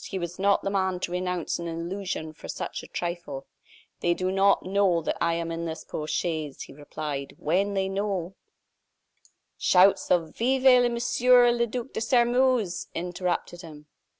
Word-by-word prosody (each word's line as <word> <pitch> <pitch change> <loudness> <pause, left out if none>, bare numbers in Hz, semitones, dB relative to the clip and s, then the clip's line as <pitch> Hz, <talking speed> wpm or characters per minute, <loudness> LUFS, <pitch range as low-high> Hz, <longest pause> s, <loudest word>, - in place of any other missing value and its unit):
He 195 - -5
was 175 0 -5
not 200 +1 +3
the 195 - -1
man 190 -2 0
to 175 - -3
renounce 180 -2 -2
an 170 - -4
illusion 170 -1 -4
for - - -11
such - - -5
a - - -12
trifle. 170 -6 -5 0.5
"They 175 0 +1
do 185 +1 -1
not 195 +1 +3
know 190 -2 +2
that - - -2
I 170 0 +2
am 165 0 -3
in 165 0 -4
this 160 -1 -5
post 155 0 -4
chaise," 155 -5 -3
he - - -12
replied. 145 -1 -6
"When 195 +6 0
they 190 0 +1
know 195 -2 -2 0.6
" - - -37
Shouts 190 +2 +5
of 165 -3 +1
"Vive 250 0 +4
Monsieur 245 +1 +4
le 235 0 +1
Duc 245 +3 -5
de - - -3
Sairmeuse!" 240 -4 +2
interrupted 175 0 -3
him. 150 -3 -12
185 Hz, 170 wpm, -26 LUFS, 165-205 Hz, 0.6 s, Shouts